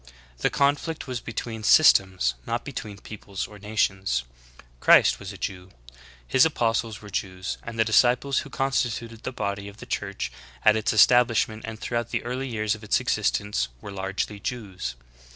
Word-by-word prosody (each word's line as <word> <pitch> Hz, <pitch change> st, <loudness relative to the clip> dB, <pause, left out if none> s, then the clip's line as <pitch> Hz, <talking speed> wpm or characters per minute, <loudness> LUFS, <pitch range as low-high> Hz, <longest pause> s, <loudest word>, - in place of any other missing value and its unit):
The -, -, +2 dB
conflict 145 Hz, +3 st, 0 dB
was 125 Hz, -2 st, -4 dB
between 115 Hz, -1 st, -5 dB
systems, 95 Hz, -, +5 dB
not -, -, -2 dB
between 105 Hz, -2 st, -6 dB
peoples 100 Hz, -2 st, -6 dB
or 105 Hz, -1 st, -12 dB
nations. 95 Hz, -, 0 dB, 0.6 s
Christ -, -, +6 dB
was 95 Hz, -, -7 dB
a 100 Hz, -, -10 dB
Jew: 95 Hz, -1 st, -5 dB, 0.6 s
His 130 Hz, -, +5 dB
apostles 115 Hz, -7 st, 0 dB
were 105 Hz, -, -10 dB
Jews, 95 Hz, -1 st, -3 dB
and 115 Hz, -1 st, -8 dB
the 110 Hz, -, +3 dB
disciples 125 Hz, +4 st, +3 dB
who -, -, -7 dB
constituted 120 Hz, -4 st, -1 dB
the 130 Hz, -, -4 dB
body 100 Hz, -4 st, -3 dB
of 100 Hz, +1 st, -11 dB
the -, -, -10 dB
Church -, -, -3 dB, 0.3 s
at 110 Hz, -, +7 dB
its 110 Hz, 0 st, +1 dB
establishment 115 Hz, -1 st, +4 dB
and 110 Hz, -1 st, -6 dB
throughout 120 Hz, -1 st, -2 dB
the -, -, -2 dB
early 125 Hz, +3 st, -3 dB
years 110 Hz, -2 st, 0 dB
of 110 Hz, 0 st, -8 dB
its 105 Hz, -, +2 dB
existence 100 Hz, -12 st, 0 dB
were 100 Hz, -, -8 dB
largely 100 Hz, +1 st, -3 dB
Jews. 100 Hz, -, -5 dB
110 Hz, 165 wpm, -25 LUFS, 100-120 Hz, 0.6 s, at